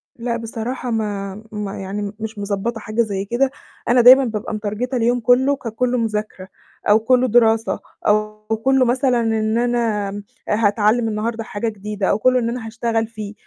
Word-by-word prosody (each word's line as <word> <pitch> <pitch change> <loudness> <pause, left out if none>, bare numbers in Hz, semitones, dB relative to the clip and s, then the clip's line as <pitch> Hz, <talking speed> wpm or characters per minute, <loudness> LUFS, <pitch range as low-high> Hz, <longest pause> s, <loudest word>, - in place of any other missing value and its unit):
لأ 235 0 -2
بصراحة 235 +2 -4
ما 205 -2 -3
ما 205 -2 -5
يعني 200 +1 -4
مش 220 -1 -6
مضبّطة 205 +3 -2
حاجة 215 +2 -1
زي 200 -3 -2
كده، 255 +5 +1 0.4
أنا 245 0 +5
دايمًا 260 +3 +8
بابقى 220 -2 -4
مترجتة 215 +5 -3
اليوم 240 +1 +2
كله 250 +4 +3
ككله 250 0 -2
مذاكرة 215 -4 -3 0.4
أو 210 +2 +6
كله 255 +3 +3
دراسة 225 -1 +3 0.3
أو 215 0 +1 0.3
كله 265 -1 +4
مثلًا 250 0 +2
إن 220 0 0
أنا 230 -4 0 0.4
هاتعلّم 215 +2 +2
النهارده 225 +1 -2
حاجة 220 +2 -3
جديدة 210 -1 -4
أو 200 - +1
كله 255 +3 +3
إن 235 -1 -1
أنا 240 -1 -4
هاشتغل 225 -1 -1
فيه، 215 -2 -7
225 Hz, 160 wpm, -20 LUFS, 210-240 Hz, 0.4 s, دايمًا